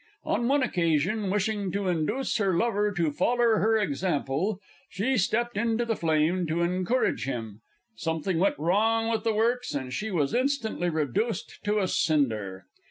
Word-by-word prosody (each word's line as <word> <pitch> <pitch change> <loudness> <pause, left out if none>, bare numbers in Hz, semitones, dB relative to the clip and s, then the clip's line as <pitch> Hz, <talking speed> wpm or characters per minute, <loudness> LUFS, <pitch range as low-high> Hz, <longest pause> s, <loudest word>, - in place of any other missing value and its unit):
On 235 +3 0
one 280 +1 +3
occasion, 180 - 0
wishing 205 -1 -1
to 200 - -1
indooce 180 - 0
her 195 -4 +1
lover 210 -1 +1
to 170 -6 0
foller 230 +7 +2
her 220 +1 +3
example, 180 0 -1 0.3
she 240 +8 0
stepped 235 +2 0
into 230 +1 +1
the 225 -1 0
flame 165 +2 +1
to 165 +2 0
encourage 185 - 0
him 115 -5 -5 0.4
something 160 +2 -1
went 195 +3 +2
wrong 225 +8 +1
with 225 - -1
the 225 -1 +1
works, 235 -3 0
and 130 -2 -4
she 220 - -3
was 155 -8 0
instantly 250 -8 0
redooced 170 - -2
to 210 +1 +1
a 190 - +1
cinder. 110 - 0
195 Hz, 160 wpm, -27 LUFS, 160-225 Hz, 0.4 s, one